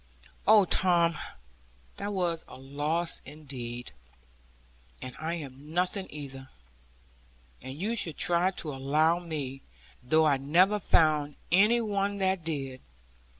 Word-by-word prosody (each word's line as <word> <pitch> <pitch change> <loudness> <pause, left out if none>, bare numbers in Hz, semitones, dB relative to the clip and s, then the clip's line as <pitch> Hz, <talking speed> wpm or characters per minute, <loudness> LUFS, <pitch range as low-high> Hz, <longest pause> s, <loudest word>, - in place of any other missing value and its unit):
'Oh, 210 -2 +7
Tom, 170 -3 +3 0.8
that 205 - -3
was 175 -4 -1
a - - -11
loss 150 +5 -2
indeed. 130 -5 -7 1.1
And 130 -1 -8
I 160 +2 -2
am 145 0 -9
nothing 185 +2 0
either. 135 -2 -8 1.1
And 130 +3 -8
you 215 +6 0
should 170 -8 -1
try 175 +1 +3
to 160 -5 -5
allow 155 +5 +2
for 175 - -12
me; 135 -4 -4 0.4
though 155 +6 +3
I 145 -3 +4
never 180 +10 +3
found 150 -5 +3 0.2
any 210 +6 +5
one 200 -2 -1
that 190 -2 0
did.' 135 -5 -4
160 Hz, 125 wpm, -29 LUFS, 140-185 Hz, 1.1 s, Oh